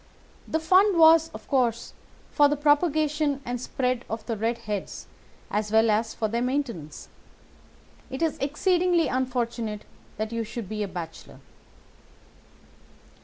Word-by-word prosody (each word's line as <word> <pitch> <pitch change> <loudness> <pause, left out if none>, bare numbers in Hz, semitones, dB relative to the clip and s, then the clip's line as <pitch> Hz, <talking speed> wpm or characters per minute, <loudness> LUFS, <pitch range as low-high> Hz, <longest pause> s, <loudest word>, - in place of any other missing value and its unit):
The 320 - 0
fund 370 +4 +4
was, 325 0 +6
of - - -11
course, 240 -4 0 0.4
for 290 - +5
the 295 - +1
propagation 295 -1 +1
and 245 0 -3
spread 255 -1 -1
of 225 0 -5
the 230 - -2
red 225 +3 -1
heads 205 -2 -5 0.5
as 210 0 -1
well 220 0 +4
as 225 +2 0
for 220 - -1
their 230 +2 -2
maintenance. 245 - -3 1.0
It 265 +5 -3
is 320 - -1
exceedingly 345 +3 +1
unfortunate 235 -4 -2 0.3
that 215 +1 -3
you 230 0 -2
should 225 -1 -6
be 215 +1 -4
a 205 - -1
bachelor. 170 -3 -8
245 Hz, 135 wpm, -26 LUFS, 220-300 Hz, 1.0 s, was